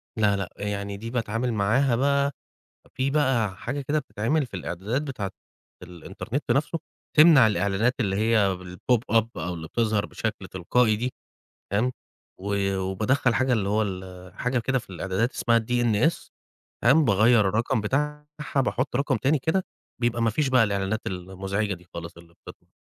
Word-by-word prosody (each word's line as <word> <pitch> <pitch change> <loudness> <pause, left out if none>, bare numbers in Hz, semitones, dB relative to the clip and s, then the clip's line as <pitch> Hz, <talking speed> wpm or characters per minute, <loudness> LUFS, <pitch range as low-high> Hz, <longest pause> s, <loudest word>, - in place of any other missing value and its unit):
لا، 105 -3 +3
لأ 95 -3 -3
يعني 100 0 -3
دي 115 +3 -6
باتعامل 115 0 -1
معاها 115 +5 +2
بقى 140 +2 +2 0.6
في 130 +1 0
بقى 130 -9 +1
حاجة 135 +8 -4
كده 145 +3 0
بتتعمل 135 +2 -1
في - - -15
الإعدادات 95 - -3
بتاعة 125 -10 -4 0.5
الإنترنت 90 - -6
نَفْسه 150 +4 +1 0.4
تمنع 155 -6 +8
الإعلانات 100 +4 +1
اللي 100 -4 0
هي 105 -3 +2
الpop 90 +7 -1 0.2
up 110 -1 +4
أو 90 0 -3
اللي 80 -1 -7
بتظهر 110 -1 0
بشكل - - -4
تلقائي 110 +5 +2
دي، 125 +3 -2 0.6
فاهم، 115 +6 +1 0.5
و 100 0 -1
وبادخَّل 110 +7 +1
حاجة 130 +2 +2
اللي 105 -5 +1
هو 105 +2 +2
ال 95 -2 -6
حاجة 125 0 -1
كده 130 +3 0
في 115 - -12
الإعدادات 95 +7 -1
اسمها 115 0 +2
DNS، 120 +5 +1 0.5
فاهم، 145 +7 +5
باغيّر 110 +2 +5
الرقم 115 +4 0
بتاعها 150 +7 -1 0.3
باحُط 130 -1 +1
رقم 140 -1 +1
تاني 135 +7 +2
كده، 160 +7 0 0.4
بيبقى 120 -1 +1
ما 115 - +3
فيش 140 +5 0
بقى 125 -3 +5
الإعلانات 100 +1 -1
المزعجة 95 +3 -3
دي 90 0 -16
خالص 85 0 -7
اللي 85 0 -16
بتطلع - - -14
110 Hz, 160 wpm, -25 LUFS, 100-130 Hz, 0.6 s, تمنع